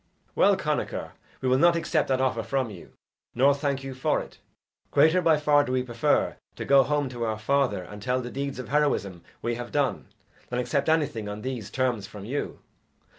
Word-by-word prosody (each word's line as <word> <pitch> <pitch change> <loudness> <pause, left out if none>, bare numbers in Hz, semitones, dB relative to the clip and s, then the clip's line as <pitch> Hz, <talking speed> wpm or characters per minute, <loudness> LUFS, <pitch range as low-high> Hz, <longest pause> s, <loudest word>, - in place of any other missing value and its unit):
"Well, - - +4
Connachar, - - -2 0.3
we 130 - -1
will 130 +1 +3
not 170 +2 +5
accept 165 -2 0
that 130 -1 +1
offer 130 -3 +1
from 130 -1 -1
you, 90 -4 -12 0.4
nor 135 +3 +5
thank 140 -1 -2
you 135 -1 -5
for 130 - 0
it. - - -10 0.5
Greater 165 +4 +4
by 165 -3 +4
far 150 -1 +4
do 125 - -4
we 130 0 +1
prefer 120 -2 +1 0.2
to - - -5
go 140 0 +6
home 145 0 0
to 120 -2 -5
our 110 -1 -1
father 130 -3 +1
and 105 +3 -10
tell 125 +3 0
the 125 -1 -6
deeds 140 0 -4
of 130 -3 -7
heroism 135 - 0 0.2
we 120 - 0
have 120 +1 -6
done, 145 -3 0 0.4
than 125 - -2
accept 125 +4 0
anything 140 -10 0
on 105 +1 -6
these 125 -5 -4
terms 125 -6 -1
from 105 -1 -10
you. 135 +6 -4
130 Hz, 200 wpm, -26 LUFS, 115-140 Hz, 0.5 s, go